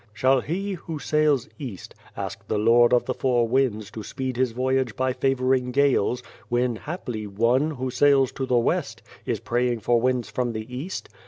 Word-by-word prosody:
Shall 130 +4 +3
he, 195 +8 -3
who 165 -3 -6
sails 150 -3 +1
east, 125 -10 -7 0.2
ask - - -6
the 110 - 0
Lord 115 +3 +5
of 125 - +3
the 130 - -1
Four 120 -3 +1
Winds 115 -4 0
to 110 - -7
speed 130 +3 -4
his 130 -1 +1
voyage 130 -1 0
by 130 0 0
favouring 130 -1 +1
gales, 130 -3 +2 0.3
when 120 0 +1
haply 120 - -5
one, 115 +9 +2
who 130 -4 -4
sails 135 0 +4
to 135 -1 -4
the 125 - +3
west, 115 - -1 0.2
is - - -1
praying 120 -1 0
for 120 +2 +2
winds 125 -1 +1
from 125 -2 -2
the 110 0 -4
east 165 +9 -5
125 Hz, 180 wpm, -24 LUFS, 120-135 Hz, 0.3 s, Lord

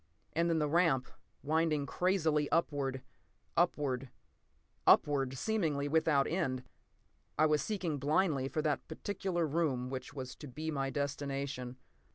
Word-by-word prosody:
p> 75 - -41 0.3
And 170 0 +3
then 165 - +2
the 150 -1 +1
ramp, 150 -5 +2 0.3
winding 155 -1 +1
crazily 160 -4 +1
upward—upward—upward, 135 -1 -1
seemingly 160 - 0
without 150 -2 +3
end. 135 -8 -1 0.7
I 155 - +5
was 150 -1 +3
seeking 180 -9 -2
blindly 150 -1 +2
for 155 +2 -2
that 150 -2 -1
particular 175 0 -2
room 140 -5 0
which 130 -1 -5
was 130 -2 -5
to 150 - -9
be 155 +5 -4
my 135 -2 -1
destination. 140 -2 -3
150 Hz, 125 wpm, -33 LUFS, 135-160 Hz, 0.7 s, I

